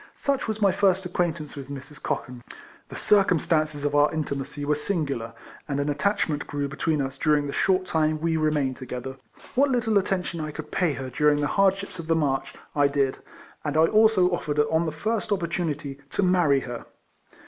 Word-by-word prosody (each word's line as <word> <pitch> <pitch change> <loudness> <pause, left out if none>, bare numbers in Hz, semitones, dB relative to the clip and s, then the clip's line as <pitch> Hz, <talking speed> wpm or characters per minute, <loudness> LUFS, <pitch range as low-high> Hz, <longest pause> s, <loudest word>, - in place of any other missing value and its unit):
Such 280 -3 -1
was 220 -1 -2
my 195 - +5
first 190 -1 +2
acquaintance 170 -4 -2
with 140 -1 -8
Mrs. 140 +1 -9
Cochan. 125 -4 -4 0.5
The - - -8
circumstances 155 -6 +2
of 145 - 0
our 145 0 +4
intimacy 145 -2 -3
were 150 - +2
singular, 145 - -2 0.3
and 140 -1 -2
an 145 +1 0
attachment 150 -2 0
grew 145 -1 -2
between 145 +1 -1
us 135 0 -6
during 150 -2 +2
the 140 - -4
short 185 -1 +2
time 155 -2 +1
we 165 +1 0
remained 150 -4 +1
together. 130 0 -6 0.4
What 275 +2 +3
little 230 -5 +2
attention 180 -4 -2
I 155 - -3
could 150 - -8
pay 175 -5 +1
her 130 -1 -6
during 150 +3 +3
the 145 - +1
hardships 195 -1 +1
of 165 - -6
the 165 - +3
march 140 -4 -1 0.2
I 145 -1 +4
did, 140 -2 0 0.4
and 150 0 -1
I 160 - +6
also 215 -2 +4
offered 155 -4 -2
on 160 +3 +2
the - - -1
first 215 +7 -2
opportunity 165 -7 -2
to 200 - 0
marry 175 -7 +3
her. 120 -2 -7
155 Hz, 185 wpm, -25 LUFS, 140-180 Hz, 0.5 s, I